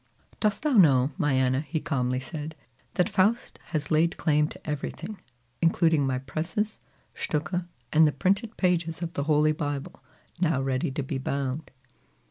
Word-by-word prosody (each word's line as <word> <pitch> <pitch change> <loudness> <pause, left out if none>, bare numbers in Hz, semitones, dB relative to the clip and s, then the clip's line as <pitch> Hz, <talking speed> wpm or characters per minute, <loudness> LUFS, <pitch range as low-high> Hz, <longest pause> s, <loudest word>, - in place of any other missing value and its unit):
"Dost 210 +3 +1
thou 305 - +2
know, 140 -7 +6
my 145 -2 +1
Anna," 130 0 +2
he 155 +2 -3
calmly 125 -4 -1
said, 150 +3 -6 0.4
"that 180 - +3
Faust 210 +6 +1
has 155 -3 -3
laid 160 +2 +3
claim 150 -2 +2
to - - -12
everything, 150 +7 -4 0.4
including 165 -3 +3
my 130 -1 0
presses, 160 +11 -3 0.3
stucke, 170 +3 -2 0.3
and 160 0 +7
the - - +2
printed 200 +9 0
pages 175 -2 +1
of 170 0 -4
the 140 - -2
Holy 155 0 +4
Bible 145 -2 -4 0.4
now 165 -6 +2
ready 135 +3 0
to 135 +2 -3
be 135 0 -3
bound?" 140 +2 -2
155 Hz, 155 wpm, -27 LUFS, 135-170 Hz, 0.4 s, and